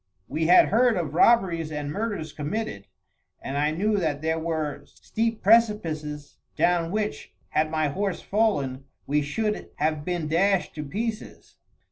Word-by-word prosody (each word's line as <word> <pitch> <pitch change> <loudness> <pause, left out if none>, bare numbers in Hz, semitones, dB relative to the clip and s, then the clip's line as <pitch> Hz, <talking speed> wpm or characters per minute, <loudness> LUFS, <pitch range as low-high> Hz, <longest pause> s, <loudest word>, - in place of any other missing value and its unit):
We 160 +3 -1
had 180 - +7
heard 235 0 +3
of 160 -5 -3
robberies 170 -5 +3
and 150 -1 -4
murders 200 -5 -3
committed; 150 - -4 0.5
and 135 - -6
I 145 +1 +2
knew 205 +7 0
that 155 -5 -1
there 160 0 0
were 160 -3 -3
steep 225 0 -3
precipices, 165 -10 +1 0.2
down 175 -1 +2
which, 210 +2 -3
had 155 0 +1
my 155 -1 0
horse 195 +4 -2
fallen, 145 -12 0 0.2
we 150 +1 +1
should 210 +9 -2
have 155 -1 -1
been 175 -2 -2
dashed 190 +4 +1
to 150 - -5
pieces. 215 +9 -5
165 Hz, 145 wpm, -25 LUFS, 150-210 Hz, 0.5 s, had